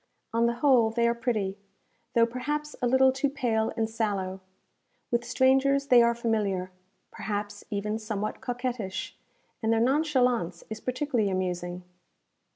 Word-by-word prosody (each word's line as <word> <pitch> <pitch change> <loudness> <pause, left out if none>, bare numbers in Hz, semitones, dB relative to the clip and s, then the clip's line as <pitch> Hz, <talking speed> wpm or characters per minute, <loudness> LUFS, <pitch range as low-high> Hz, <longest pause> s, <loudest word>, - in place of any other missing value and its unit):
On 230 +1 +3
the 235 - 0
whole, 245 -5 +5
they 235 +1 +1
are 235 - +3
pretty; 215 -5 -2 0.6
though 230 -1 +6
perhaps 295 +5 -3
a 245 - +2
little 260 +1 +5
too 270 +2 0
pale 230 -5 0
and 225 -1 +1
sallow. 200 -4 -2 0.7
With 235 0 +1
strangers 270 +2 +3
they 245 -1 +8
are 235 0 +3
familiar, 205 -6 -1 0.4
perhaps 205 0 -4
even 210 +1 -2
somewhat 215 -1 -4
coquettish, 240 -6 -4 0.5
and 220 -1 +1
their 225 - +3
nonchalance 250 - +1
is 220 0 -5
particularly 255 -4 0
amusing. 180 -1 -3
230 Hz, 140 wpm, -28 LUFS, 205-255 Hz, 0.7 s, they